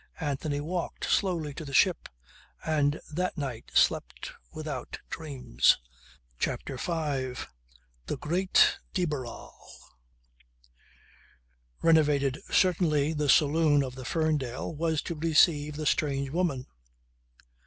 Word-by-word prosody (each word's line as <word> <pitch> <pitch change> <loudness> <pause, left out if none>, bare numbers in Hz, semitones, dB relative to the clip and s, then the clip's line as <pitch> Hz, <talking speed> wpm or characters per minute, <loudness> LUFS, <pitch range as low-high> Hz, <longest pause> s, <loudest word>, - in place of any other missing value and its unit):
Anthony 145 -1 -2
walked 170 +4 -3
slowly 170 -7 0
to 160 - -7
the 140 -2 -5
ship 185 +3 +3 0.6
and 150 -1 +1
that 180 +3 -1
night 130 -6 -5
slept - - +1 0.2
without 150 -5 -6
dreams. 130 - +2 0.6
CHAPTER 130 - -3
FIVE 140 -5 -2 0.6
THE - - -2
GREAT 185 +4 +3 0.2
DE 180 - +2
BARRAL 135 -7 -5 2.3
Renovated 150 -3 +3
certainly 160 -5 +2
the 150 -2 -1
saloon 150 -1 +4
of 130 -2 -5
the 130 0 -8
Ferndale 150 -2 -1
was 160 0 -1
to - - -4
receive 150 -2 +3
the 155 +1 -4
"strange 140 -3 0
woman." 160 -6 -1
150 Hz, 105 wpm, -28 LUFS, 140-165 Hz, 2.3 s, saloon